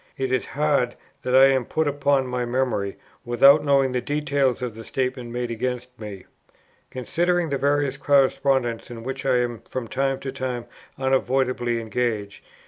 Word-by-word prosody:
It 130 Hz, -1 st, -2 dB
is 130 Hz, -2 st, 0 dB
hard 145 Hz, -5 st, +1 dB, 0.3 s
that 125 Hz, 0 st, 0 dB
I 135 Hz, +1 st, +9 dB
am 135 Hz, -2 st, +3 dB
put 155 Hz, +6 st, -1 dB
upon 140 Hz, -1 st, +1 dB
my 125 Hz, -1 st, -2 dB
memory, 120 Hz, -5 st, -1 dB, 0.3 s
without 135 Hz, +5 st, +6 dB
knowing 140 Hz, -2 st, +3 dB
the 125 Hz, -1 st, -1 dB
details 140 Hz, -2 st, 0 dB
of 120 Hz, -3 st, -3 dB
the 115 Hz, +1 st, -9 dB
statement 130 Hz, 0 st, -3 dB
made 120 Hz, 0 st, -3 dB
against 125 Hz, +2 st, -3 dB
me, 100 Hz, -4 st, -8 dB, 0.6 s
considering 170 Hz, +6 st, 0 dB
the 140 Hz, -1 st, -1 dB
various 140 Hz, -1 st, +1 dB
correspondence 135 Hz, -4 st, +2 dB
in 115 Hz, -2 st, -8 dB
which 135 Hz, +2 st, -4 dB
I 130 Hz, -2 st, +4 dB
am 120 Hz, -2 st, -2 dB
from 125 Hz, -3 st, -4 dB
time 135 Hz, +2 st, -1 dB
to 135 Hz, -, -4 dB
time 130 Hz, -3 st, -4 dB, 0.3 s
unavoidably 130 Hz, -2 st, +1 dB
engaged.... 110 Hz, -3 st, -3 dB
130 Hz, 160 wpm, -24 LUFS, 120-140 Hz, 0.6 s, I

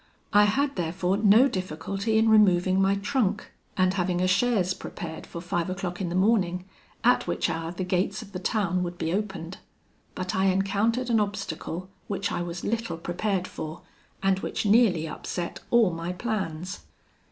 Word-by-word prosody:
I 205 Hz, 0 st, +7 dB
had, 275 Hz, +7 st, +1 dB
therefore, 180 Hz, +3 st, 0 dB
no 215 Hz, +5 st, +6 dB
difficulty 195 Hz, -, -2 dB
in 220 Hz, +1 st, +4 dB
removing 190 Hz, -3 st, +5 dB
my 195 Hz, +1 st, +3 dB
trunk, 210 Hz, -1 st, -1 dB, 0.3 s
and 185 Hz, -1 st, +3 dB
having 180 Hz, -2 st, 0 dB
a 185 Hz, -, +2 dB
chaise 190 Hz, -2 st, +2 dB
prepared 160 Hz, -4 st, -7 dB
for 170 Hz, -, -7 dB
five 175 Hz, 0 st, -2 dB
o'clock 185 Hz, -1 st, -4 dB
in 180 Hz, -, -1 dB
the 175 Hz, -, -3 dB
morning, 185 Hz, -3 st, +2 dB, 0.4 s
at -, -, +4 dB
which -, -, 0 dB
hour 165 Hz, 0 st, -3 dB
the 180 Hz, +1 st, -4 dB
gates 180 Hz, +4 st, -1 dB
of 200 Hz, -, -14 dB
the 185 Hz, -, -5 dB
town 185 Hz, -2 st, 0 dB
would 175 Hz, 0 st, -4 dB
be 165 Hz, 0 st, -1 dB
opened; 195 Hz, -4 st, -3 dB, 0.6 s
but 185 Hz, -1 st, -3 dB
I 190 Hz, 0 st, +2 dB
encountered 205 Hz, +6 st, +1 dB
an 225 Hz, -, +4 dB
obstacle 190 Hz, -4 st, -3 dB, 0.2 s
which 200 Hz, 0 st, -2 dB
I 175 Hz, -, -1 dB
was 175 Hz, 0 st, -5 dB
little 225 Hz, -6 st, -2 dB
prepared 185 Hz, +2 st, -2 dB
for, 155 Hz, +1 st, -7 dB, 0.4 s
and 195 Hz, -1 st, +3 dB
which -, -, -3 dB
nearly 200 Hz, -7 st, +4 dB
upset 170 Hz, +2 st, -5 dB
all 230 Hz, -6 st, +4 dB
my 165 Hz, +2 st, -4 dB
plans. 185 Hz, -4 st, -3 dB
190 Hz, 170 wpm, -26 LUFS, 175-210 Hz, 0.6 s, I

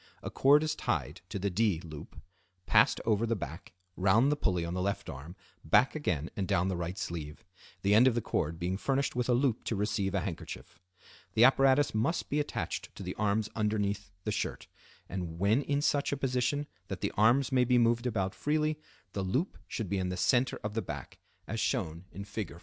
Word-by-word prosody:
A -, -, -4 dB
cord 145 Hz, +3 st, +5 dB
is 155 Hz, -1 st, 0 dB
tied 75 Hz, -, -2 dB
to -, -, -4 dB
the 100 Hz, +1 st, -1 dB
"D" 100 Hz, -3 st, +2 dB
loop, 80 Hz, -4 st, -10 dB, 0.5 s
passed -, -, +4 dB
over 115 Hz, +1 st, +2 dB
the 115 Hz, -, +1 dB
back, 85 Hz, -2 st, -7 dB, 0.2 s
round 110 Hz, +9 st, +4 dB
the -, -, +2 dB
pulley 90 Hz, -, 0 dB
on 85 Hz, -, -4 dB
the 90 Hz, -, -1 dB
left 100 Hz, +1 st, -2 dB
arm, 80 Hz, +7 st, -9 dB, 0.3 s
back 120 Hz, +12 st, +4 dB
again 85 Hz, -, -2 dB
and 95 Hz, -2 st, -2 dB
down 90 Hz, +3 st, +2 dB
the 95 Hz, -, -1 dB
right 85 Hz, +2 st, -4 dB
sleeve; 80 Hz, +2 st, -5 dB, 0.4 s
the 100 Hz, +1 st, +3 dB
end 115 Hz, +5 st, +7 dB
of 125 Hz, -, +3 dB
the -, -, +2 dB
cord 80 Hz, -7 st, -2 dB
being 90 Hz, +2 st, -2 dB
furnished 135 Hz, +5 st, 0 dB
with 125 Hz, 0 st, -1 dB
a 120 Hz, -, +5 dB
loop 125 Hz, -3 st, +1 dB
to 115 Hz, -, -1 dB
receive 100 Hz, -1 st, -1 dB
a 95 Hz, -, +1 dB
handkerchief. 90 Hz, -4 st, -7 dB, 0.6 s
The 110 Hz, -, +6 dB
apparatus 135 Hz, +2 st, +5 dB
must 115 Hz, +11 st, 0 dB
be 145 Hz, -, +2 dB
attached 145 Hz, -, -3 dB
to -, -, -7 dB
the -, -, -4 dB
arms 105 Hz, 0 st, +1 dB
underneath 105 Hz, -2 st, -1 dB
the 105 Hz, -, -2 dB
shirt, 100 Hz, -, -3 dB, 0.4 s
and 85 Hz, -3 st, -5 dB
when 100 Hz, +8 st, +3 dB
in 145 Hz, 0 st, -1 dB
such 145 Hz, -1 st, +1 dB
a 140 Hz, -, -1 dB
position 135 Hz, +2 st, 0 dB, 0.2 s
that 95 Hz, -3 st, -5 dB
the -, -, 0 dB
arms 120 Hz, +5 st, +4 dB
may 130 Hz, -1 st, +4 dB
be 125 Hz, 0 st, +3 dB
moved 120 Hz, +1 st, +3 dB
about 95 Hz, -5 st, -1 dB
freely, 155 Hz, +1 st, 0 dB, 0.3 s
the 100 Hz, -, -2 dB
loop 125 Hz, -, -1 dB
should 110 Hz, -, -4 dB
be 95 Hz, +2 st, -1 dB
in 90 Hz, -1 st, -1 dB
the 90 Hz, -, -3 dB
center 125 Hz, +7 st, +2 dB
of 105 Hz, 0 st, -3 dB
the 115 Hz, -, -1 dB
back, 75 Hz, -, -7 dB, 0.3 s
as -, -, -3 dB
shown 80 Hz, +3 st, -1 dB
in 100 Hz, -, -7 dB
Fig. 100 Hz, -4 st, -5 dB
105 Hz, 210 wpm, -31 LUFS, 90-125 Hz, 0.6 s, end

